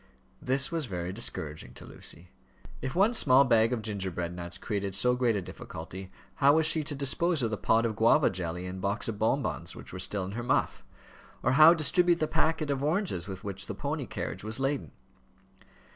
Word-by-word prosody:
This 135 +3 +1
was 165 -5 -1
very 90 -2 -4
discouraging 80 -8 -3
to - - -10
Lucy. 85 +1 -9 0.5
If 130 0 -4
one 200 +6 +4
small 135 - +6
bag 115 -3 +3
of 120 -3 -2
gingerbread 95 -5 -3
nuts 85 0 -5
created 100 -3 -3
so 125 +5 +2
great 125 -3 +1
a 100 - -2
difficulty, 90 +3 -9 0.3
how 140 0 +5
was 160 0 +3
she 160 -1 +2
to 145 - -3
dispose 145 +3 +1
of 115 - 0
the 105 - -2
pot 115 +3 +2
of 110 -2 -1
guava 115 +8 +4
jelly 90 -1 -4
and 95 +1 -6
box 100 +3 -1
of 110 -3 -4
bonbons, 130 +6 -1
which - - -11
were 90 - -6
still 95 +1 -2
in 95 - -6
her 115 +4 -4
muff; 120 +2 0 0.6
or 130 - +2
how 155 +5 +8
distribute 175 +2 +3
the 155 - +2
packet 160 -2 0
of 140 0 -2
oranges 155 - -1
with 95 -2 -7
which 100 -1 -6
the - - -5
pony - - -3
carriage - - -5
was 110 +3 -4
laden? 135 - -1
115 Hz, 200 wpm, -29 LUFS, 95-145 Hz, 0.6 s, how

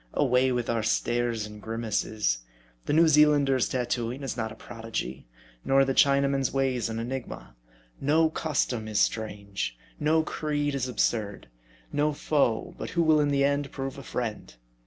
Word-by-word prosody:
Away 130 +1 +3
with 120 -2 -1
our 115 -1 0
stares 120 0 0
and 105 0 -10
grimaces. 110 - -1 0.5
The - - +1
New 165 +2 +6
Zealander's 145 -4 +4
tattoo 120 -2 -1
ing 135 +3 -7
is 135 - -3
not 110 -2 -3
a - - -9
prodigy; 110 - -6 0.4
nor 135 0 +4
the 135 - 0
Chinaman's 140 -1 +3
ways 130 -3 0
an 110 - -4
enigma. 120 - -6 0.4
No 155 +3 +3
custom 130 -9 -1
is 105 -1 0
strange; 100 - -2 0.2
no 160 +2 +3
creed 145 -2 -2
is 130 -2 -1
absurd; 105 - -1 0.4
no 150 +1 +1
foe, 140 -6 0
but - - -4
who 170 -1 +1
will 155 -1 +4
in 145 -1 +2
the 140 -1 +2
end 140 0 0
prove 135 0 -5
a - - -7
friend. 115 - -5
130 Hz, 160 wpm, -27 LUFS, 115-145 Hz, 0.5 s, New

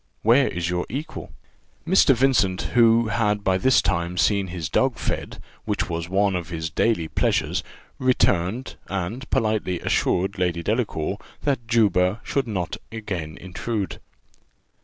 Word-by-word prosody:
Where 120 +5 +5
is 85 -1 -2
your 90 0 -1
equal?" 150 +6 -6 0.6
Mr. 165 -6 +5
Vincent, 115 -8 +2
who 115 -1 +5
had 105 -2 0
by 95 -1 +2
this 130 +5 +4
time 85 +1 -1
seen 100 0 +2
his 85 -3 -4
dog - - +1
fed, - - -4 0.3
which - - -2
was 85 0 -3
one 100 0 +2
of 90 -1 -4
his 80 -2 -4
daily 95 -3 +1
pleasures, - - 0 0.4
returned, 120 -3 +1
and 100 +8 -4
politely 110 -7 0
assured 95 +3 0
Lady 85 -2 0
Delacour 100 -4 -1 0.2
that 130 -5 -1
Juba 105 -4 +3
should 135 -3 -1
not 95 -6 -3
again 95 -8 -5
intrude. 95 +3 -4
100 Hz, 140 wpm, -23 LUFS, 90-115 Hz, 0.6 s, Where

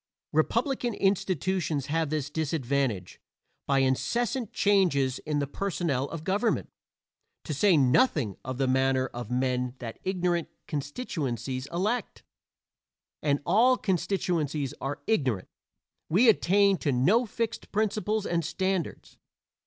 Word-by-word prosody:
Republican 235 - +1
institutions 185 -6 0
have 160 +1 0
this 150 -2 -2
disadvantage: 140 - -1 0.5
by 140 - +2
incessant 195 - 0
changes 170 -11 +2
in 150 -1 0
the 145 - +1
personnel 155 -4 -1
of 165 -2 -6
government 205 +6 0 0.7
to 155 - -4
say 180 +4 +4
nothing 135 - +3
of 130 0 -5
the 135 - +1
manner 130 0 +2
of 120 -2 -6
men 125 0 0
that 115 -3 -7
ignorant 180 -3 0 0.2
constituencies 140 - -3
elect; 205 +10 -2 1.0
and 145 -1 +1
all 250 +5 +4
constituencies 165 - -1
are 140 +1 -4
ignorant 130 - 0 0.6
we 205 +10 +4
attain 200 -2 +4
to 145 - 0
no 190 - +3
fixed 230 +1 -4
principles 215 0 0
and 170 -1 0
standards. 190 +1 -3
160 Hz, 115 wpm, -28 LUFS, 135-200 Hz, 1.0 s, say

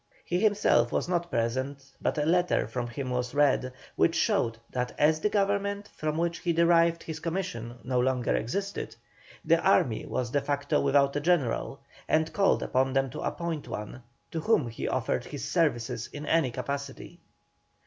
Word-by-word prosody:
He 175 - 0
himself 200 - +3
was - - 0
not 175 -1 -1
present, 130 +4 -2
but - - 0
a 150 - +1
letter 175 +2 +2
from 120 +1 -3
him 130 +2 -5
was 125 +1 -2
read, 140 -3 +3 0.2
which - - +3
showed 115 -1 +1
that 125 -1 -3
as 155 +1 +3
the 210 - +1
Government 200 0 0
from 155 0 -2
which 170 0 -1
he 170 - 0
derived 170 0 +3
his 160 -1 -6
commission 165 - -4
no 125 0 0
longer 125 -1 +1
existed, 195 - -3 0.5
the - - +4
army - - +2
was 120 -2 -2
de 145 - +1
facto 140 0 0
without 140 0 +3
a - - +1
General, 145 -6 0 0.3
and 160 +1 +1
called 195 -1 +3
upon 130 0 +1
them 135 -1 +1
to - - -6
appoint 170 -3 -3
one, 105 +4 -6 0.3
to 165 - -2
whom 155 - +2
he 115 - -4
offered - - -1
his - - -6
services 120 0 0
in 145 +1 -7
any 160 -5 +2
capacity. 140 +3 -5
145 Hz, 170 wpm, -28 LUFS, 125-170 Hz, 0.5 s, the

